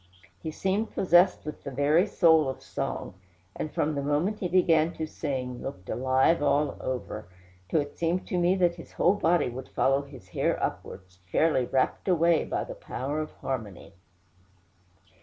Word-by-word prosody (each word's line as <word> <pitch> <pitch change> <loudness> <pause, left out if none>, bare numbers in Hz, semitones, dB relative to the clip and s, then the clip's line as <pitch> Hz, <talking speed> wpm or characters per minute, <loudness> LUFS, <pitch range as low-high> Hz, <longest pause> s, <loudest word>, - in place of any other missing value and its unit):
He - - -4
seemed 195 +7 -2
possessed 180 0 +4
with 150 - -6
the - - -5
very 145 +8 +3
soul 160 -7 +4
of 130 - -6
song; - - -4 0.4
and 155 - -4
from 155 - 0
the 140 - -2
moment 150 +9 0
he 180 - -1
began 170 -2 +3
to 160 - -3
sing, 130 -5 -4
looked 90 -9 -7
alive 130 +6 +2
all 145 -1 +2
over, 120 -5 -4 0.4
till 160 - +2
it 145 0 -9
seemed 170 +2 0
to 180 -5 0
me 175 +2 +3
that 175 -2 +2
his 165 - -12
whole 180 - +3
body 175 -6 +2
would 130 +2 -8
follow 135 +1 +2
his 135 -9 -13
hair - - 0
upwards, 90 0 -5
fairly 155 -6 +3
rapt 130 +8 0
away 170 -2 +3
by - - -2
the - - -7
power 150 - -4
of 155 - -3
harmony. 110 -10 -5
155 Hz, 170 wpm, -27 LUFS, 130-175 Hz, 0.4 s, possessed